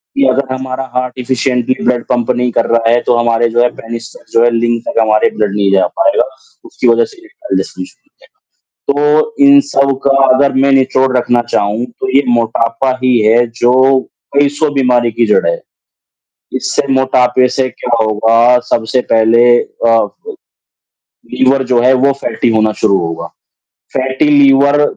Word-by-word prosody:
कि 275 Hz, -, +2 dB
अगर 130 Hz, -1 st, -1 dB
हमारा 130 Hz, 0 st, -5 dB
हार्ट 125 Hz, 0 st, -2 dB
इफिशिएंटली 125 Hz, 0 st, -1 dB
ब्लड 125 Hz, -1 st, 0 dB
पंप 120 Hz, -2 st, 0 dB
नहीं 125 Hz, 0 st, -1 dB
कर 115 Hz, 0 st, 0 dB
रहा 115 Hz, -1 st, +1 dB
है, 120 Hz, +1 st, +3 dB
तो 120 Hz, -, 0 dB
हमारे 120 Hz, 0 st, +1 dB
जो 120 Hz, +1 st, 0 dB
है 125 Hz, -, +2 dB
पेनिस 115 Hz, 0 st, -8 dB, 0.2 s
जो 115 Hz, -, +3 dB
है, 120 Hz, -, +4 dB
लिंग 115 Hz, 0 st, 0 dB
तक -, -, -1 dB
हमारे 110 Hz, -1 st, +2 dB
ब्लड 105 Hz, -2 st, -1 dB
नहीं 100 Hz, -1 st, 0 dB
जा 95 Hz, -, +3 dB
पाएगा, 300 Hz, -3 st, +2 dB, 0.4 s
उसकी -, -, -3 dB
वज़ह 465 Hz, -, +3 dB
से 430 Hz, -3 st, -17 dB
इरेक्टाइल 345 Hz, -3 st, -6 dB
डिस्फंक्शन -, -, -7 dB, 0.9 s
तो 150 Hz, +9 st, +1 dB
इन 280 Hz, 0 st, +6 dB
सब 140 Hz, -, 0 dB
का 140 Hz, -, +3 dB, 0.2 s
अगर 140 Hz, +2 st, +1 dB
मैं 135 Hz, +1 st, +2 dB
निचोड़ 130 Hz, -1 st, +1 dB
रखना 120 Hz, 0 st, +1 dB
चाहूँ, 105 Hz, +3 st, -1 dB
तो 125 Hz, +1 st, -7 dB
ये 140 Hz, -, +4 dB
मोटापा 115 Hz, +1 st, 0 dB
ही 125 Hz, -1 st, +2 dB
है 115 Hz, +3 st, +3 dB
जो 130 Hz, +2 st, +3 dB, 0.4 s
कई 145 Hz, 0 st, +3 dB
100 155 Hz, +1 st, 0 dB
बीमारी 125 Hz, -3 st, +1 dB
की 115 Hz, +1 st, 0 dB
जड़ 105 Hz, -, +1 dB
है, -, -, -2 dB, 1.0 s
इससे 130 Hz, +1 st, -2 dB
मोटापे 130 Hz, -1 st, +2 dB
से 130 Hz, +1 st, -1 dB
क्या 120 Hz, -1 st, -3 dB
होगा, 115 Hz, +3 st, +2 dB
सबसे 115 Hz, +3 st, 0 dB
पहले 115 Hz, +1 st, +3 dB, 0.2 s
अ, 115 Hz, 0 st, -1 dB
फ़ -, -, -12 dB, 1.0 s
लीवर 135 Hz, +1 st, +2 dB
जो 120 Hz, -, +3 dB
है 130 Hz, +1 st, +4 dB
वो 140 Hz, -, +3 dB
फैटी -, -, -1 dB
होना 110 Hz, 0 st, +1 dB
शुरू 100 Hz, -3 st, +2 dB
होगा, 80 Hz, -, -6 dB, 0.7 s
फैटी 130 Hz, +3 st, -1 dB
लीवर 140 Hz, 0 st, +3 dB
125 Hz, 170 wpm, -12 LUFS, 115-135 Hz, 1.0 s, इन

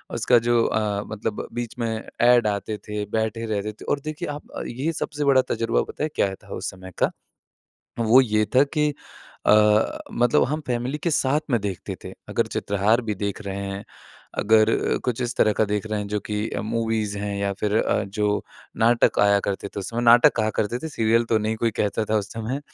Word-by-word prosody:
उसका 125 Hz, -, +4 dB
जो 120 Hz, 0 st, +2 dB
अ, 105 Hz, -2 st, 0 dB
मतलब 110 Hz, 0 st, -4 dB
बीच 120 Hz, -1 st, -4 dB
में 115 Hz, -, 0 dB, 0.3 s
ऐड 120 Hz, -2 st, +5 dB
आते 105 Hz, +1 st, -2 dB
थे, 105 Hz, 0 st, -5 dB
बैठे 110 Hz, +2 st, -2 dB
रहते 105 Hz, -1 st, -2 dB
थे 105 Hz, -, -13 dB
और 145 Hz, -, +1 dB
देखिए 155 Hz, 0 st, -4 dB
आप 145 Hz, 0 st, -7 dB, 0.2 s
ये 135 Hz, +7 st, -2 dB
सबसे 150 Hz, -1 st, -3 dB
बड़ा 135 Hz, -2 st, +5 dB
तजुर्बा 115 Hz, 0 st, +1 dB
पता -, -, -6 dB
है 155 Hz, -, 0 dB
क्या 95 Hz, -, +1 dB
था -, -, -21 dB
उस -, -, -4 dB
समय 95 Hz, 0 st, -11 dB
का -, -, +2 dB, 0.9 s
वो 115 Hz, +3 st, +6 dB
ये 110 Hz, -4 st, +2 dB
था 130 Hz, -, +7 dB
कि 150 Hz, 0 st, +3 dB, 0.6 s
अ, 105 Hz, 0 st, +4 dB
मतलब 120 Hz, 0 st, +3 dB
हम 150 Hz, +3 st, -1 dB
फैमिली 125 Hz, +4 st, -2 dB
के 170 Hz, -, -1 dB
साथ 145 Hz, -1 st, +2 dB
में 120 Hz, -3 st, +2 dB
देखते 100 Hz, -3 st, -4 dB
थे। -, -, -7 dB, 0.2 s
अगर -, -, 0 dB
चित्रहार 100 Hz, +4 st, +1 dB
भी 105 Hz, -, 0 dB
देख 100 Hz, 0 st, -3 dB
रहे 100 Hz, -1 st, -5 dB
हैं, 100 Hz, +1 st, -5 dB, 0.5 s
अगर 110 Hz, +1 st, +3 dB
कुछ 125 Hz, -1 st, -1 dB
इस 120 Hz, -1 st, -2 dB
तरह 110 Hz, -, +4 dB
का 110 Hz, -, +2 dB
देख 105 Hz, +1 st, -1 dB
रहे 110 Hz, -1 st, -2 dB
हैं 105 Hz, -, -4 dB
जो 105 Hz, 0 st, -1 dB
कि 105 Hz, +1 st, -1 dB
मूवीज़ 110 Hz, -2 st, -1 dB
हैं 100 Hz, 0 st, -3 dB
या 100 Hz, 0 st, 0 dB
फिर 105 Hz, -1 st, 0 dB
अ, -, -, +1 dB
जो 105 Hz, +1 st, -1 dB, 0.3 s
नाटक 115 Hz, +1 st, +3 dB
आया 100 Hz, 0 st, +4 dB
करते 100 Hz, 0 st, -3 dB
थे 100 Hz, -, -6 dB
उस 95 Hz, -, -5 dB
समय 115 Hz, +1 st, -2 dB
नाटक 120 Hz, +1 st, +7 dB
कहा 110 Hz, -1 st, +1 dB
करते 115 Hz, +3 st, -1 dB
थे, 160 Hz, -, -5 dB
सीरियल 115 Hz, -4 st, +2 dB
तो 115 Hz, -1 st, +2 dB
नहीं 110 Hz, +1 st, -1 dB
कोई 115 Hz, +1 st, +1 dB
कहता 105 Hz, +1 st, 0 dB
था 110 Hz, -, +3 dB
उस 105 Hz, +1 st, -6 dB
समय 115 Hz, +5 st, -3 dB
110 Hz, 210 wpm, -24 LUFS, 105-120 Hz, 0.9 s, था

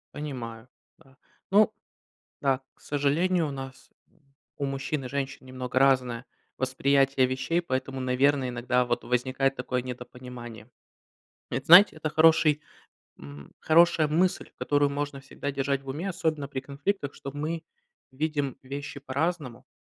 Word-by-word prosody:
Понимаю, 125 Hz, -5 st, -6 dB, 0.3 s
да, 135 Hz, 0 st, -23 dB, 0.3 s
ну 215 Hz, +2 st, +5 dB, 0.7 s
Да. 135 Hz, -2 st, +1 dB
К -, -, -30 dB
сожалению, 160 Hz, +4 st, +1 dB
у 145 Hz, -, -4 dB
нас, 135 Hz, -1 st, -9 dB, 0.7 s
у 140 Hz, -, -1 dB
мужчин 135 Hz, 0 st, -3 dB
и -, -, -3 dB
женщин, 135 Hz, 0 st, -4 dB
немного 130 Hz, 0 st, -5 dB
разное 130 Hz, -3 st, +3 dB, 0.3 s
восприятие 135 Hz, 0 st, +2 dB
вещей, 130 Hz, +7 st, 0 dB
поэтому, 130 Hz, -3 st, -3 dB
наверное, 130 Hz, +1 st, +2 dB
иногда 125 Hz, +1 st, +1 dB
вот 120 Hz, 0 st, -1 dB
возникает 130 Hz, +2 st, 0 dB
такое 125 Hz, 0 st, -2 dB
недопонимание. 125 Hz, -3 st, -9 dB, 0.8 s
Это, 130 Hz, +3 st, -3 dB
знаете, 175 Hz, -1 st, +9 dB
это 155 Hz, 0 st, -2 dB
хороший, 155 Hz, -1 st, +4 dB, 0.6 s
м 70 Hz, 0 st, -11 dB
хорошая 160 Hz, -1 st, +4 dB
мысль, 175 Hz, +4 st, +1 dB
которую 145 Hz, 0 st, +2 dB
можно 145 Hz, -1 st, -3 dB
всегда 140 Hz, +1 st, -5 dB
держать 140 Hz, 0 st, -1 dB
в 135 Hz, -, -14 dB
уме, 155 Hz, +9 st, -3 dB
особенно 155 Hz, -5 st, -1 dB
при 135 Hz, -2 st, -4 dB
конфликтах, 140 Hz, +3 st, -3 dB
что 140 Hz, -, -7 dB
мы 155 Hz, +4 st, -3 dB, 0.5 s
видим 145 Hz, -1 st, -2 dB
вещи 140 Hz, +2 st, -6 dB
по-разному 140 Hz, -1 st, -3 dB
135 Hz, 135 wpm, -27 LUFS, 130-150 Hz, 0.8 s, знаете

